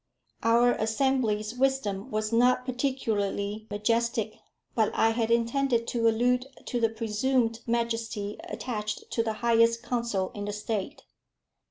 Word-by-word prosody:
Our 235 +2 +4
Assembly's 220 -2 0
wisdom 250 -6 0
was 215 +1 -2
not 250 +2 +4
particularly 220 -5 -1
majestic; 225 +1 0 0.3
but 220 -3 +2
I 225 - +4
had 225 0 0
intended 235 +1 +2
to 230 -1 +1
allude 250 +3 +2 0.2
to 245 - -2
the 225 -1 +3
presumed 225 +1 0
majesty 230 -3 -2
attached 215 -4 -4
to 230 - +1
the 225 -1 -1
highest 230 0 +4
council 235 -6 -1
in 205 -1 -5
the 205 - -3
State. 210 +5 -4
230 Hz, 130 wpm, -28 LUFS, 215-245 Hz, 0.3 s, Our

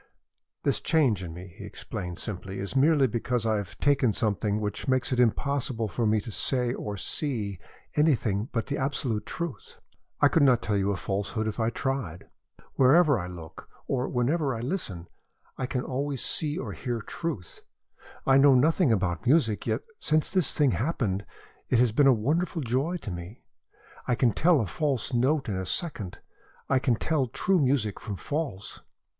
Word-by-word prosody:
"This - - +1
change 135 - +2
in 85 - -6
me," 90 +1 -10
he - - -7
explained 90 -1 -6
simply, 95 -2 -5
"is 100 +5 -4
merely 145 +1 +5
because 120 0 -1
I 110 -1 +2
have 100 -3 -6
taken 135 -6 +3
something 105 0 0
which 105 +4 -4
makes 130 -1 +1
it 125 - +1
impossible 125 -1 +1
for 115 +2 -1
me 110 0 +3
to 115 - -8
say 125 +1 0
or 105 -5 -5
see 105 - -2 0.4
anything 120 -8 +2
but 115 - -1
the 140 - -3
absolute 135 -5 -2
truth. 170 -5 -6 0.4
I 145 - +6
could 160 - +2
not 130 -4 +5
tell 105 - 0
you 100 0 +1
a 100 - -2
falsehood 100 +3 -2
if 110 +2 -4
I 110 0 +2
tried. 115 -8 -3 0.5
Wherever 145 0 +5
I 90 - -4
look, 85 -3 -10 0.2
or 130 -1 -1
whenever 135 +2 +1
I 115 - -4
listen, 110 - -4 0.5
I 130 - -3
can 125 -1 -2
always 135 0 -1
see 155 0 +1
or - - -4
hear 120 -3 -3
truth. 130 - -5 0.6
I 135 0 +5
know 140 -1 +7
nothing 155 +2 +4
about 95 -2 0
music, 120 -8 +3
yet - - 0 0.2
since 155 0 +1
this 185 -7 +1
thing 145 -4 +4
happened 110 - -1 0.4
it 125 - +3
has 120 -1 +4
been 135 +6 +4
a - - +8
wonderful 165 +2 0
joy 135 +9 0
to 100 - -5
me. 90 +6 -8 0.6
I 125 - +2
can 120 -1 +3
tell 160 - +4
a - - -1
false 130 - -1
note 135 +4 +2
in 105 - -2
a 95 - -2
second, 125 - -3 0.5
I 130 - +4
can 125 -2 +2
tell 140 +2 0
true 185 +10 +1
music 130 -7 +1
from 105 - -5
false. 140 - -4
125 Hz, 180 wpm, -27 LUFS, 105-145 Hz, 0.6 s, a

